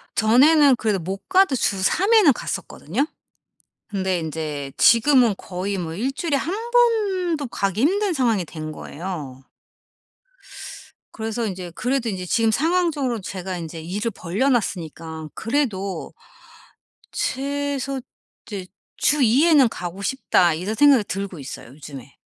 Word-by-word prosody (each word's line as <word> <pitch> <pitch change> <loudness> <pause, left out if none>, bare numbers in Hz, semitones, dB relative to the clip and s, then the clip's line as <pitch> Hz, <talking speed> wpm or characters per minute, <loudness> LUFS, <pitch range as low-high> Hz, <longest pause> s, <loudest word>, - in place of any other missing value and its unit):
전에는 275 +6 +5
그래도 210 -4 0
못 190 +3 -6
가도 375 -7 +4
주 195 -5 0
3 395 - +2
회는 375 - +7
갔었거든요. 225 - -3 0.8
근데 190 -3 -1
인제 155 -3 -4
지금은 235 -2 +5
거의 190 +2 -4
뭐 165 -2 -4
일주일에 275 - -1
1 425 - -4
번도 390 - +2
가기 200 -2 -2
힘든 390 +5 +2
상황이 230 - +1
된 155 -1 -7
거예요. 150 -6 -7 1.7
그래서 225 +1 -3
인제 185 -3 -5
그래도 245 -2 -1
인제 185 -2 -4
지금 225 +4 +2
상황적으로 305 -4 +1
제가 185 -1 -5
인제 165 -1 -7
일을 205 +7 -3
벌려 200 +11 -1
놨으니까 160 - -3
그래도 220 -7 -2 1.0
'최소 275 0 -2 0.5
이제 195 -4 -6 0.3
주 295 -1 +2
2 255 +7 +4
회는 290 -7 +6
가고 180 -1 -6
싶다.' 195 -7 +2
이런 185 +7 -3
생각이 280 -3 +6
들고 195 -4 -4
있어요, 135 -3 -8
요즘에. 140 -1 -11
220 Hz, 270 characters per minute, -22 LUFS, 180-280 Hz, 1.7 s, 회는